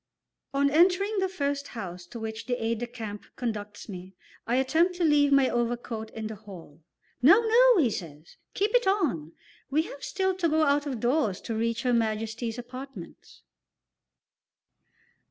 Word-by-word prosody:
On 280 Hz, 0 st, +2 dB
entering 375 Hz, +6 st, +3 dB
the 380 Hz, 0 st, 0 dB
first 285 Hz, -5 st, -2 dB
house 180 Hz, -4 st, -7 dB
to 230 Hz, -, -8 dB
which 220 Hz, +1 st, -6 dB
the 245 Hz, -, 0 dB
aide 230 Hz, -1 st, -2 dB
de 240 Hz, -, -3 dB
camp 220 Hz, -4 st, -7 dB
conducts 210 Hz, -4 st, -5 dB
me, 185 Hz, -2 st, -9 dB, 0.3 s
I 235 Hz, -, +1 dB
attempt 320 Hz, +8 st, +2 dB
to 355 Hz, -, -1 dB
leave 295 Hz, -2 st, +4 dB
my 275 Hz, -1 st, +5 dB
overcoat 235 Hz, -2 st, -2 dB
in 220 Hz, -1 st, -7 dB
the 220 Hz, -, -4 dB
hall. 185 Hz, -7 st, -12 dB, 0.4 s
"No, 330 Hz, -, +8 dB
no," 470 Hz, +1 st, +5 dB
he 265 Hz, -10 st, +3 dB
says, 160 Hz, -4 st, -8 dB, 0.2 s
"keep 410 Hz, +4 st, 0 dB
it -, -, +3 dB
on; 265 Hz, -, 0 dB, 0.4 s
we 300 Hz, +3 st, +2 dB
have 285 Hz, -, -10 dB
still 380 Hz, 0 st, 0 dB
to 340 Hz, -3 st, +1 dB
go 315 Hz, +1 st, +3 dB
out 290 Hz, 0 st, +2 dB
of 260 Hz, -5 st, -3 dB
doors 240 Hz, -5 st, +1 dB
to 230 Hz, -, -4 dB
reach 230 Hz, +1 st, -1 dB
Her 250 Hz, -1 st, +2 dB
Majesty's 225 Hz, +1 st, -1 dB
apartments." 250 Hz, -5 st, -10 dB
245 Hz, 165 wpm, -27 LUFS, 220-310 Hz, 0.4 s, No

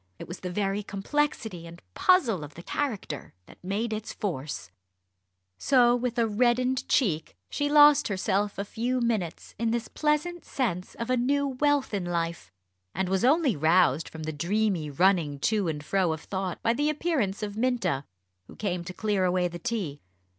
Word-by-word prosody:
It -, -, -9 dB
was 175 Hz, -, -7 dB
the 180 Hz, -, -5 dB
very 195 Hz, +2 st, -1 dB
complexity 205 Hz, -, -2 dB
and 170 Hz, +1 st, -11 dB
puzzle 240 Hz, -, +3 dB
of 145 Hz, 0 st, -10 dB
the 170 Hz, -, -10 dB
character 210 Hz, -, -4 dB
that -, -, -18 dB
made 210 Hz, +5 st, -2 dB
its 215 Hz, 0 st, -4 dB
force. 135 Hz, -, -4 dB, 0.9 s
So 245 Hz, -3 st, +4 dB
with 245 Hz, 0 st, -2 dB
a 235 Hz, -, +3 dB
reddened 250 Hz, +4 st, +1 dB
cheek, 165 Hz, -, +1 dB
she 290 Hz, 0 st, 0 dB
lost 295 Hz, 0 st, +7 dB
herself 200 Hz, +1 st, -1 dB
a 200 Hz, -, -2 dB
few 245 Hz, +5 st, -1 dB
minutes 220 Hz, -8 st, -2 dB
in 230 Hz, 0 st, +1 dB
this 230 Hz, 0 st, -1 dB
pleasant 310 Hz, +3 st, -1 dB
sense 190 Hz, -9 st, -3 dB
of 235 Hz, +2 st, -3 dB
a 255 Hz, -, +3 dB
new 280 Hz, +3 st, +1 dB
wealth 285 Hz, -1 st, +1 dB
in 200 Hz, -3 st, -1 dB
life; 170 Hz, -, -3 dB, 0.4 s
and 190 Hz, -1 st, -1 dB
was 190 Hz, 0 st, +1 dB
only 280 Hz, -, +4 dB
roused 160 Hz, 0 st, +3 dB
from 160 Hz, -1 st, -8 dB
the 155 Hz, 0 st, -3 dB
dreamy 180 Hz, 0 st, 0 dB
running 165 Hz, -2 st, +2 dB
to 210 Hz, 0 st, +1 dB
and 150 Hz, -2 st, -3 dB
fro 180 Hz, 0 st, +1 dB
of 160 Hz, -, -6 dB
thought 190 Hz, -1 st, -4 dB
by 230 Hz, -, +3 dB
the 290 Hz, +4 st, +1 dB
appearance 275 Hz, -, -1 dB
of 205 Hz, -1 st, -4 dB
Minta, 220 Hz, -, 0 dB, 0.4 s
who -, -, -13 dB
came 180 Hz, -4 st, -2 dB
to 180 Hz, -, -6 dB
clear 205 Hz, -1 st, 0 dB
away 180 Hz, 0 st, +2 dB
the 175 Hz, 0 st, -7 dB
tea. 200 Hz, -, -3 dB
205 Hz, 175 wpm, -27 LUFS, 175-250 Hz, 0.9 s, lost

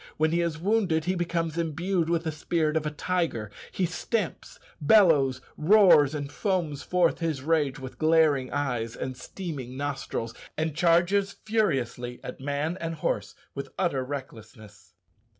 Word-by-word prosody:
When 155 Hz, 0 st, +2 dB
he 170 Hz, +1 st, +2 dB
is 170 Hz, -3 st, -1 dB
wounded 180 Hz, -3 st, +1 dB
he 185 Hz, -, +1 dB
becomes 170 Hz, -2 st, -1 dB
imbued 170 Hz, +2 st, -1 dB
with 170 Hz, -1 st, +1 dB
the 160 Hz, -, -2 dB
spirit 155 Hz, 0 st, -1 dB
of 155 Hz, -1 st, 0 dB
a -, -, +1 dB
tiger: 150 Hz, -, -2 dB, 0.2 s
he 185 Hz, -, 0 dB
stamps, 185 Hz, +3 st, -3 dB, 0.2 s
bellows, 145 Hz, -8 st, +5 dB, 0.2 s
roars, 155 Hz, -5 st, +6 dB
and 145 Hz, -1 st, -4 dB
foams 170 Hz, -6 st, -1 dB
forth 180 Hz, -2 st, +1 dB
his 160 Hz, -6 st, -2 dB
rage 150 Hz, -3 st, +1 dB
with 130 Hz, -1 st, -9 dB
glaring 155 Hz, -5 st, +3 dB
eyes 125 Hz, -5 st, -2 dB
and 130 Hz, 0 st, -4 dB
steaming 130 Hz, -3 st, -7 dB
nostrils, 135 Hz, -5 st, -3 dB, 0.2 s
and 155 Hz, -1 st, -1 dB
charges 175 Hz, +4 st, +3 dB
furiously 130 Hz, -, -1 dB
at -, -, -7 dB
man 145 Hz, +6 st, -2 dB
and 165 Hz, 0 st, -3 dB
horse 105 Hz, -9 st, -2 dB, 0.2 s
with 140 Hz, -, -6 dB
utter 155 Hz, -8 st, 0 dB
recklessness. 110 Hz, -8 st, -9 dB
155 Hz, 150 wpm, -27 LUFS, 135-175 Hz, 0.2 s, roars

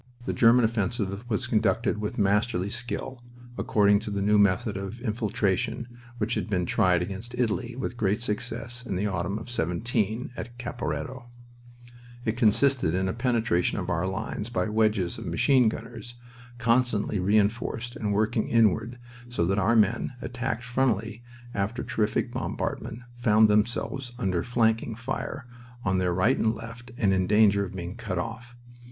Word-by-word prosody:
The -, -, -1 dB
German 120 Hz, 0 st, +5 dB
offensive 105 Hz, 0 st, -2 dB
was 105 Hz, -, 0 dB
conducted 110 Hz, 0 st, +1 dB
with 105 Hz, 0 st, -3 dB
masterly 100 Hz, -1 st, +1 dB
skill, 120 Hz, +3 st, -4 dB, 0.3 s
according 100 Hz, -3 st, +3 dB
to 105 Hz, -, -6 dB
the 100 Hz, -1 st, -1 dB
new 105 Hz, +1 st, +4 dB
method 100 Hz, +2 st, +2 dB
of 100 Hz, +4 st, -5 dB
"infiltration" 115 Hz, 0 st, -1 dB, 0.3 s
which 115 Hz, +1 st, -1 dB
had -, -, -2 dB
been 90 Hz, -3 st, +1 dB
tried 90 Hz, 0 st, +3 dB
against 100 Hz, +6 st, -6 dB
Italy 120 Hz, 0 st, -1 dB
with 125 Hz, -1 st, -4 dB
great 105 Hz, -1 st, +1 dB
success 120 Hz, +2 st, -3 dB
in 110 Hz, -, -4 dB
the 95 Hz, +3 st, -1 dB
autumn 95 Hz, 0 st, -1 dB
of 110 Hz, -, -8 dB
'17 110 Hz, +3 st, -1 dB
at 120 Hz, -1 st, -7 dB
Caporetto. 125 Hz, +1 st, -4 dB, 1.0 s
It 110 Hz, -, 0 dB
consisted 120 Hz, -, +3 dB
in 95 Hz, +1 st, 0 dB
a 95 Hz, -, -1 dB
penetration 115 Hz, -6 st, +1 dB
of -, -, -2 dB
our 85 Hz, +3 st, 0 dB
lines 100 Hz, +3 st, -4 dB
by 120 Hz, -, 0 dB
wedges 105 Hz, -4 st, +1 dB
of -, -, -7 dB
machine 130 Hz, -5 st, +4 dB
gunners 120 Hz, +2 st, -8 dB, 0.4 s
constantly 115 Hz, -3 st, +1 dB
reinforced 110 Hz, +4 st, +1 dB
and 105 Hz, -2 st, -2 dB
working 110 Hz, +2 st, +1 dB
inward 115 Hz, +1 st, +2 dB, 0.3 s
so 105 Hz, -8 st, 0 dB
that 95 Hz, +4 st, +1 dB
our 110 Hz, +4 st, +3 dB
men, 110 Hz, +3 st, +2 dB
attacked 125 Hz, -2 st, -3 dB
frontally 120 Hz, -3 st, 0 dB, 0.3 s
after 105 Hz, +5 st, -2 dB
terrific 105 Hz, -2 st, 0 dB
bombardment, 115 Hz, -, -4 dB, 0.2 s
found 110 Hz, -2 st, +5 dB
themselves 120 Hz, +4 st, 0 dB
under 95 Hz, -8 st, 0 dB
flanking 115 Hz, -1 st, +1 dB
fire 125 Hz, +2 st, -4 dB, 0.4 s
on 95 Hz, -1 st, +2 dB
their 90 Hz, -1 st, +1 dB
right 95 Hz, +9 st, +2 dB
and 110 Hz, 0 st, +2 dB
left 115 Hz, +2 st, -9 dB
and 100 Hz, -5 st, +3 dB
in 95 Hz, -1 st, +1 dB
danger 105 Hz, -1 st, +4 dB
of 95 Hz, 0 st, -9 dB
being 90 Hz, 0 st, -5 dB
cut 110 Hz, -6 st, -4 dB
off. 115 Hz, +6 st, -5 dB
110 Hz, 155 wpm, -27 LUFS, 100-120 Hz, 1.0 s, German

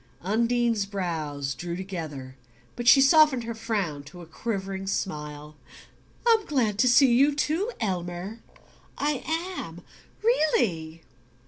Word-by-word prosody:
Undine's 230 Hz, +1 st, +1 dB
brows 155 Hz, -8 st, -3 dB
drew 170 Hz, +6 st, -5 dB
together, 160 Hz, -9 st, -6 dB, 0.4 s
but 240 Hz, 0 st, -5 dB
she 270 Hz, -, +8 dB
softened 275 Hz, -2 st, +5 dB
her 230 Hz, 0 st, -4 dB
frown 205 Hz, -10 st, -2 dB
to 150 Hz, +5 st, -13 dB
a -, -, -10 dB
quivering 195 Hz, +2 st, -4 dB
smile. 150 Hz, -5 st, -4 dB, 0.7 s
"I'm 455 Hz, -2 st, +4 dB
glad 225 Hz, -8 st, 0 dB
to 255 Hz, -, +4 dB
see 250 Hz, 0 st, +6 dB
you 280 Hz, +4 st, +4 dB
too, 325 Hz, +10 st, 0 dB
Elmer 185 Hz, 0 st, -4 dB, 0.6 s
I 290 Hz, -2 st, -1 dB, 0.4 s
am, -, -, -8 dB, 0.4 s
REALLY!" 185 Hz, -, +1 dB
200 Hz, 120 wpm, -26 LUFS, 165-245 Hz, 0.7 s, she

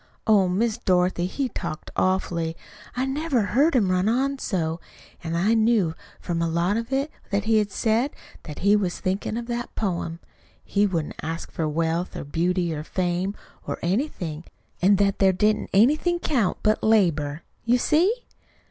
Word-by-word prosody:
Oh, 205 Hz, -4 st, +5 dB
Miss 220 Hz, +5 st, 0 dB
Dorothy, 180 Hz, -3 st, +1 dB
he 270 Hz, +8 st, -2 dB
talked 155 Hz, -8 st, -6 dB
awfully. 170 Hz, -3 st, 0 dB, 0.4 s
I 255 Hz, -, +1 dB
never 270 Hz, -3 st, 0 dB
heard 275 Hz, +10 st, +2 dB
him 200 Hz, -7 st, +3 dB
run 185 Hz, +3 st, +2 dB
on 270 Hz, +4 st, 0 dB
so. 165 Hz, -6 st, -1 dB, 0.4 s
An' 165 Hz, 0 st, -3 dB
I 195 Hz, +7 st, +2 dB
knew, 220 Hz, -7 st, +3 dB, 0.3 s
from 170 Hz, -2 st, -2 dB
a 165 Hz, -, +1 dB
lot 170 Hz, +4 st, +1 dB
of 230 Hz, +2 st, -3 dB
it 275 Hz, +3 st, 0 dB, 0.2 s
that 200 Hz, 0 st, 0 dB
he 220 Hz, 0 st, +3 dB
said, 225 Hz, +5 st, 0 dB, 0.3 s
that 150 Hz, -, -9 dB
he 205 Hz, +1 st, +6 dB
was 190 Hz, -4 st, -1 dB
thinkin' 195 Hz, +3 st, -2 dB
of 235 Hz, -, -4 dB
that 240 Hz, 0 st, -4 dB
poem 170 Hz, -5 st, -2 dB, 0.5 s
he 205 Hz, 0 st, +2 dB
wouldn't 165 Hz, -5 st, -3 dB
ask 165 Hz, +1 st, -5 dB
for 160 Hz, -, -2 dB
wealth 165 Hz, +3 st, -1 dB
or -, -, -4 dB
beauty 170 Hz, +3 st, 0 dB
or 150 Hz, -1 st, -4 dB
fame, 180 Hz, +3 st, -1 dB, 0.3 s
or -, -, -2 dB
anything, 175 Hz, -, -2 dB, 0.4 s
an' 195 Hz, +3 st, +5 dB
that 195 Hz, 0 st, +1 dB
there 190 Hz, -1 st, +5 dB
didn't 210 Hz, +3 st, +1 dB
anything 300 Hz, -, +3 dB
count 255 Hz, -, 0 dB
but 215 Hz, 0 st, +2 dB
labor. 165 Hz, -9 st, +2 dB, 0.2 s
You 240 Hz, +2 st, +3 dB
see?" 325 Hz, -, +3 dB
195 Hz, 165 wpm, -24 LUFS, 170-230 Hz, 0.5 s, he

